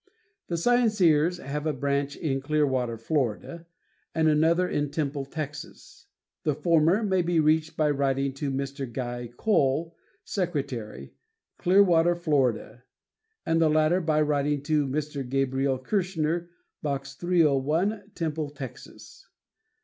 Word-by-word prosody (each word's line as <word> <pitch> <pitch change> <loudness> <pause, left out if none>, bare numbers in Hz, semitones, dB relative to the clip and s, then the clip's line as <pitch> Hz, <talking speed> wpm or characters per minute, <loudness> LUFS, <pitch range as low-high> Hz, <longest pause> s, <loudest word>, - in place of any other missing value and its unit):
The 170 - -2
Scienceers 180 -6 +3
have 150 +2 -4
a 155 - +1
branch 140 +1 -1
in 135 -5 -2
Clearwater, 135 -5 0
Florida, 145 +6 -2 0.5
and 160 -1 +3
another 165 +4 +3
in 145 -3 -1
Temple, 145 -2 -2
Texas. 150 0 -8 0.3
The 150 -3 0
former 170 +6 +3
may 190 -3 +2
be 175 -1 +1
reached 155 +1 +2
by 150 -1 +2
writing 135 -1 0
to 140 +1 -3
Mr. 135 -1 -4
Guy 120 -1 -4
Cole, 165 -5 +1 0.3
Secretary, 135 - -4 0.5
Clearwater, 175 -2 +4
Florida, 135 -7 0 0.6
and 165 0 +2
the 160 - +4
latter 155 +4 +3
by 155 -2 +1
writing 145 -1 0
to 150 -1 +1
Mr. 145 0 -3
Gabriel 135 0 0
Kirschner, 170 +1 -1 0.3
Box 135 -2 -3
301, 170 +5 +1
Temple, 155 -2 -2
Texas. 135 -4 -11
150 Hz, 120 wpm, -26 LUFS, 135-170 Hz, 0.6 s, Clearwater